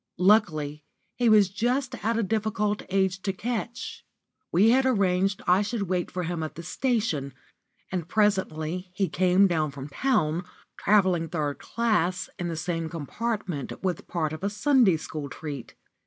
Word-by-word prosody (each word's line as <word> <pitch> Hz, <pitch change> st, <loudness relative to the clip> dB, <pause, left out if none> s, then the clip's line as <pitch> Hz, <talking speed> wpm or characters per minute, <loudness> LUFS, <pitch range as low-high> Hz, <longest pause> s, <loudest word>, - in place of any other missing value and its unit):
Luckily, 160 Hz, -7 st, +2 dB, 0.3 s
he 240 Hz, -2 st, +2 dB
was 210 Hz, -3 st, +6 dB
just 245 Hz, +5 st, -1 dB
at 225 Hz, +2 st, +1 dB
a 230 Hz, -, +1 dB
difficult 210 Hz, 0 st, 0 dB
age 190 Hz, 0 st, +1 dB
to 195 Hz, -, -1 dB
catch. 240 Hz, -, -4 dB, 0.5 s
We 205 Hz, +7 st, +5 dB
had 265 Hz, +2 st, +4 dB
arranged 195 Hz, -5 st, +1 dB
I 180 Hz, +2 st, +4 dB
should 210 Hz, 0 st, -2 dB
wait 180 Hz, -2 st, -1 dB
for 180 Hz, 0 st, -3 dB
him 170 Hz, -1 st, -3 dB
at 155 Hz, -, -5 dB
the 170 Hz, -, -7 dB
station, 175 Hz, -, -1 dB, 0.6 s
and 175 Hz, -3 st, -2 dB
presently 185 Hz, -4 st, 0 dB
he 195 Hz, 0 st, +1 dB
came 185 Hz, +3 st, +4 dB
down 160 Hz, -5 st, +1 dB
from 140 Hz, 0 st, -8 dB
town, 175 Hz, -, +1 dB, 0.3 s
travelling 185 Hz, -5 st, +2 dB
third 150 Hz, -4 st, -2 dB
class, 200 Hz, -6 st, 0 dB
in 175 Hz, -, -2 dB
the 170 Hz, -, -3 dB
same 165 Hz, 0 st, -2 dB
compartment 180 Hz, -, -4 dB
with 180 Hz, -3 st, -2 dB
part 160 Hz, -3 st, -1 dB
of 155 Hz, -, -7 dB
a 200 Hz, -, +1 dB
Sunday 210 Hz, -, +4 dB
school 150 Hz, -2 st, -6 dB
treat. 145 Hz, -3 st, -7 dB
185 Hz, 155 wpm, -26 LUFS, 165-215 Hz, 0.6 s, was